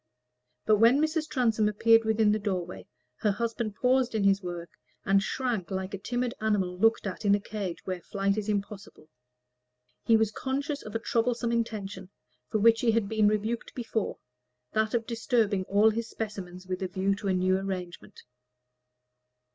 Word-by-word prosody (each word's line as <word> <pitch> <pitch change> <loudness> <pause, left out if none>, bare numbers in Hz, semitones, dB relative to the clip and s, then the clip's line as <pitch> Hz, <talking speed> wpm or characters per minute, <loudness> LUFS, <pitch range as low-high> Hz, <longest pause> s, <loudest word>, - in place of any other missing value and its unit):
But 215 -1 +4
when 230 +5 +6
Mrs. 310 0 0
Transome 225 -6 +2
appeared 225 +2 +4
within 220 -1 +3
the 215 - +1
doorway, 180 - -4 0.3
her 210 - +1
husband 225 0 -2
paused 250 -1 +2
in 215 - +1
his 195 0 +3
work 175 -2 -6 0.3
and 195 +1 +4
shrank 230 -4 -2
like 190 0 -4
a 200 - -4
timid 245 +3 -2
animal 200 -4 0
looked 225 +5 +2
at 195 +1 -5
in 200 -1 +4
a - - -1
cage 200 -4 -5
where 185 -2 -4
flight 195 +2 -1
was 215 0 -3
impossible. 200 -5 -5 0.9
He 225 - +5
was 220 -1 +1
conscious 280 +5 -3
of 215 - -9
a - - +1
troublesome 235 0 0
intention, 205 -5 -3 0.4
for 220 - 0
which 225 +2 +4
he 230 -2 +3
had 225 -3 +1
been 215 0 +2
rebuked 215 +2 -1
before 225 -3 -2 0.5
that 220 +1 0
of 230 -1 0
disturbing 225 -5 0
all 205 +3 +4
his 225 +1 -4
specimens 190 -4 -6
with 185 +1 -4
a 190 - -1
view 190 +2 0
to 200 - -5
a 190 - +2
new 185 +1 +2
arrangement. 185 -3 -6
215 Hz, 170 wpm, -28 LUFS, 195-230 Hz, 0.9 s, when